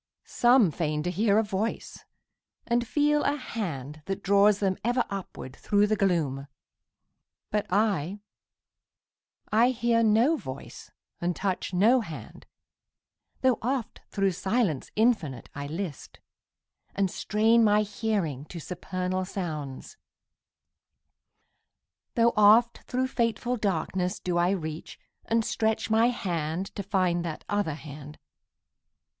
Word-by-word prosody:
Some 240 -7 +4
feign 150 -2 -2
to 180 - -1
hear 205 +3 +2
a 220 - +4
voice 210 +2 -4 0.6
and 235 0 0
feel 295 +2 +2
a 285 - +1
hand 155 - -5
That 195 +1 -4
draws 200 +1 +5
them 195 -2 0
ever 240 +2 +1
upward 185 -9 -7
thro' 205 0 +2
the 215 +1 +1
gloom. 155 -9 0 1.0
But 210 -1 0
I 200 -2 0 1.3
I 230 +3 +5
hear 235 -2 +1
no 230 +8 +4
voice 130 - -9 0.3
and 175 0 -1
touch 190 -2 -2
no 215 +8 +4
hand, 155 - -9 0.9
Tho' 255 -2 +3
oft 250 0 -3
thro' 195 -1 +1
silence 190 - -1
infinite 215 - +1
I 140 0 -5
list, 165 -1 -6 0.8
And 195 -2 +1
strain 225 +2 +3
my 210 0 +4
hearing 200 - -2
to 170 - -8
supernal 185 +2 -3
sounds; 160 - -6 2.2
Tho' 235 -1 +4
oft 220 +3 +5
thro' 255 +1 0
fateful 245 0 -1
darkness 185 -2 -1
do 175 -1 -1
I 175 +1 +3
reach, 160 -4 -4 0.3
And 225 -1 +1
stretch 220 0 -1
my 225 +2 +5
hand 175 -6 -2
to - - -4
find 185 -3 0
that 165 -3 -6
other 205 -7 -1
hand. 150 -1 -10
200 Hz, 120 wpm, -27 LUFS, 170-225 Hz, 2.2 s, draws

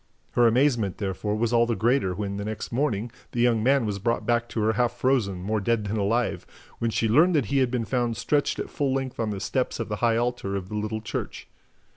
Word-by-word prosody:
Her 120 -1 +4
amazement, 120 -5 +2
therefore, 105 0 -2
was 115 +2 0
all 120 0 +4
the 115 - 0
greater 115 -5 +1
when, 100 0 -3
the 100 - -4
next 110 0 -5
morning, 120 -4 -1 0.2
the 120 - -2
young 120 -2 +3
man 135 +1 +3
was 100 -2 -2
brought 115 +3 -1
back 120 0 +1
to 110 - -2
her 110 +1 +2
half 120 +1 +1
frozen, 120 -7 0
more 105 +2 -1
dead 115 +1 +1
than 105 +2 -2
alive, 115 +4 0
and - - -22
when 115 - 0
she 115 0 0
learned 160 +11 +4
that 140 -5 +2
he 140 - +4
had 130 -2 +2
been 120 -2 -1
found 120 -2 -1
stretched 145 +8 0
at - - -5
full 135 -2 0
length 135 -1 -3
on 115 -2 0
the 100 -2 -3
steps 130 +5 -1
of 115 - -3
the 105 - -2
high 115 0 +2
altar 120 -5 -1
of 95 -1 -4
the 105 - -5
little 110 +1 -2
church. 115 - -5
115 Hz, 245 wpm, -26 LUFS, 105-125 Hz, 0.2 s, Her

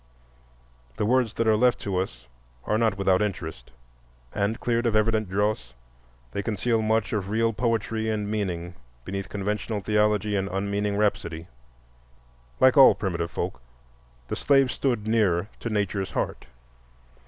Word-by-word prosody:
The - - 0
words 120 -1 +2
that 115 - 0
are 110 - +5
left 125 +1 +3
to 100 -2 -2
us 60 -10 -5 0.4
are 105 - 0
not 110 -3 +1
without 95 -1 +2
interest, 80 -11 -4 0.6
and, 105 +2 -1
cleared 120 0 0
of 110 - 0
evident 110 -1 +2
dross, 100 - -1 0.6
they 100 - -2
conceal 110 +2 0
much 110 0 0
of 100 -3 -2
real 115 +2 +1
poetry 110 0 -1
and 105 -2 -1
meaning 90 -5 -3 0.3
beneath 100 0 -4
conventional 105 +2 -2
theology 105 0 +1
and 95 0 -1
unmeaning 100 +1 -1
rhapsody. 85 -5 -1 1.1
Like 130 +3 +5
all 135 - +9
primitive 85 -4 -2
folk, 60 - -4 0.7
the - - -3
slave 135 -2 +3
stood 120 -5 -1
near 105 -4 +2
to 115 - -4
Nature's 100 -2 -1
heart. - - -3
105 Hz, 140 wpm, -26 LUFS, 95-110 Hz, 1.1 s, all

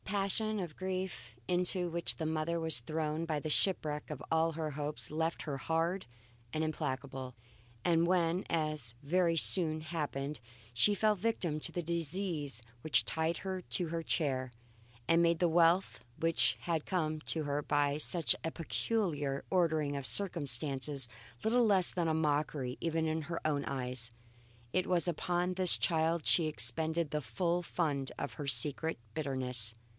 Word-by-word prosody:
The 205 - -4
passion 210 +2 0
of 175 -5 -6
grief 185 -11 -5
into 180 0 +2
which 170 0 +1
the 160 - -3
mother 160 +2 -1
was 160 -6 +4
thrown 155 +4 -3
by 155 -3 -2
the 155 +1 -3
shipwreck 150 -5 0
of 150 -2 -6
all 160 0 +1
her 155 -1 -4
hopes 150 +1 -2
left 160 +2 -2
her 145 -3 -4
hard 165 +6 -1 0.5
and 155 +3 -1
implacable, 130 -3 -4 0.5
and 170 -1 +3
when, 175 0 +1
as 155 -8 +1
very 170 +2 +1
soon 160 -2 +6
happened, 150 -3 -4 0.3
she 205 - +4
fell 215 +1 +2
a - - -6
victim 180 -7 -2
to - - 0
the 175 - -4
disease 165 - -2 0.2
which 155 - +3
tied 160 +1 -1
her 190 -1 -5
to 175 0 +1
her 165 +1 -4
chair 130 -7 0 0.6
and 165 +1 +4
made 170 -1 +2
the 175 - +3
wealth 165 - +2 0.2
which 115 -10 +2
had 165 -1 -2
come 155 -4 -2
to 160 0 -2
her 145 0 -2
by 145 0 0
such 165 +2 +3
a 165 - -2
peculiar 160 -6 -2
ordering 160 -5 +1
of 140 -1 -4
circumstances 140 -6 +3 0.3
little 230 0 +2
else 185 -3 +7
than 170 -2 -1
a - - +1
mockery 150 -4 -1
even 165 -1 -1
in 160 0 -1
her 165 +2 -5
own 145 -2 0
eyes, 125 -3 -3 0.6
it 185 0 +1
was 180 -1 +2
upon 175 +2 -1
this 185 -1 +5
child 165 -1 0
she 165 -3 +4
expended 155 +4 +1
the 150 - -2
full 175 +5 -1
fund 145 -7 -2
of - - -5
her 145 -3 -7
secret 140 +4 +1
bitterness. 125 -6 -1
160 Hz, 160 wpm, -32 LUFS, 145-175 Hz, 0.6 s, else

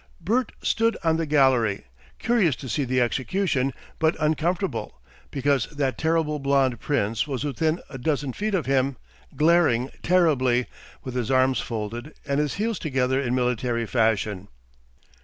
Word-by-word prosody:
Bert 220 +8 0
stood 230 0 +1
on 160 -1 +2
the 165 -1 -2
gallery, 130 -8 +2 0.3
curious 210 - +2
to 130 - -9
see 140 +4 -1
the 130 0 +1
execution, 135 +3 0 0.3
but 160 0 +2
uncomfortable, 165 +5 -1 0.3
because 140 -2 +1
that 140 -3 -2
terrible 160 -2 +1
blond 135 -3 +1
Prince 115 -4 0
was 135 -2 -3
within 155 +4 0
a 135 - -9
dozen 140 -1 -1
feet 210 - -1
of 175 - -1
him, 135 -1 +1 0.4
glaring 150 -6 +3
terribly, 135 -9 +3 0.4
with 130 - -6
his 125 -2 -2
arms 130 0 +3
folded, 115 +5 -5
and 140 -1 0
his 150 -2 -1
heels 220 0 -1
together 130 -3 0
in 125 -2 -1
military 125 -1 0
fashion. 110 -4 0
140 Hz, 145 wpm, -24 LUFS, 125-160 Hz, 0.4 s, glaring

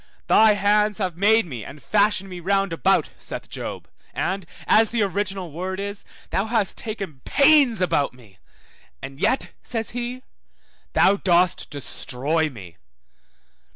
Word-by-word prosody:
Thy 220 -1 +6
hands 210 +1 +2
have 185 -5 -2
made 215 +4 +4
and 125 +5 -8
fashioned 205 +2 +1
me 180 -2 -8
round 195 0 0
about, 160 - +2
saith - - -7
Job, - - -6 0.3
and 190 -1 -2 0.2
(as 220 0 +4
the 230 -2 +1
original 195 -3 -3
word 185 +4 -4
is) 200 0 -5 0.3
thou 195 - 0
hast 220 -4 +1
taken 195 - -6
pains 280 -6 +4
about 165 -6 +1
me, 110 -7 -19 0.6
and 135 - -9
yet 240 +6 0
(says 225 -2 -3
he) 245 +2 -5 0.7
thou 200 +1 +4
dost 180 -2 +2
destroy 145 +2 -2
me. 95 - -12
195 Hz, 135 wpm, -23 LUFS, 165-215 Hz, 0.7 s, Thy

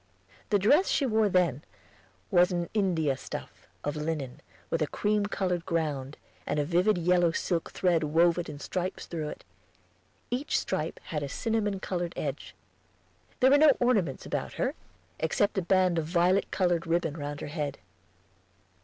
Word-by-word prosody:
The 205 - +4
dress 285 - +4
she 280 - +2
wore 220 -3 +2
then 170 -7 +2 0.7
was 180 -1 +5
an 175 -1 -2
India 170 -9 +1
stuff, 130 - -8 0.2
of 145 +1 -2
linen, 150 -4 -4 0.3
with 165 - 0
a 155 - +2
cream 210 +3 0
colored 180 -4 -1
ground, 150 -5 -2 0.3
and - - -1
a 145 - +1
vivid 180 +6 +2
yellow 175 0 +3
silk 170 -2 -1
thread 175 -3 +1
woven 170 +3 +3
in 150 - -7
stripes 180 +5 -4
through 155 -3 -4
it; - - -9 0.9
each 255 +4 0
stripe - - -2
had 155 -4 -4
a 140 - -4
cinnamon 210 - -1
colored 175 -2 -3
edge. 140 -1 -5 0.9
There 260 +1 +6
were 285 - +6
no 300 -2 +6
ornaments 210 - +1
about - - -3
her, - - -1 0.5
except 200 +6 +1
a - - -1
band 185 -1 +3
of 160 - -2
violet 180 +3 +2
colored 175 -3 0
ribbon 165 -2 0
round 145 -2 -5
her - - -5
head. 145 -4 -3
175 Hz, 160 wpm, -28 LUFS, 155-195 Hz, 0.9 s, There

